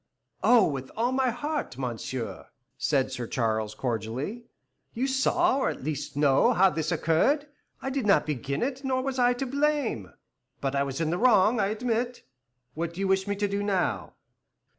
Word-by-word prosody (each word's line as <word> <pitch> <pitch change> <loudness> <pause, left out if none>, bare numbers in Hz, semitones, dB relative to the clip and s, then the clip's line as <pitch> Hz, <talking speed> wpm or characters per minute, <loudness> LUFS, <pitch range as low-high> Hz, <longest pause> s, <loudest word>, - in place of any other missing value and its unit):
"Oh, 240 -4 +6
with 135 -4 -4
all 240 +3 +1
my 260 -1 +2
heart, 290 - -3
monsieur," 125 -1 -4 0.3
said 135 -3 +1
Sir 125 -2 -4
Charles, 110 -3 -1
cordially. 125 - -3 0.5
"You 250 +3 0
saw, 275 +4 +2
or - - +1
at - - -6
least 145 0 -4
know, 140 -2 +4
how 190 +1 +5
this 155 0 -2
has - - 0
occurred. 275 - +2 0.4
I 270 - -2
did 265 -5 -1
not 200 - +4
begin 140 - -2
it, 270 +1 -3
nor 260 -1 0
was 265 -1 -2
I 245 0 +4
the 245 +2 -3
most 250 - -7
to 280 - -4
blame. 285 - 0 0.5
But 135 0 -2
I 140 - +2
was 140 +2 -2
in 160 -1 0
the 175 - -1
wrong, 220 -1 +4
I 195 - +2
admit. 240 +3 -2 0.5
What 170 +1 -4
do - - -8
you 195 - 0
wish 190 +1 +1
me 205 - 0
to 205 +1 0
do 200 0 -2
now?" 195 -3 -1
195 Hz, 195 wpm, -27 LUFS, -, 0.5 s, Oh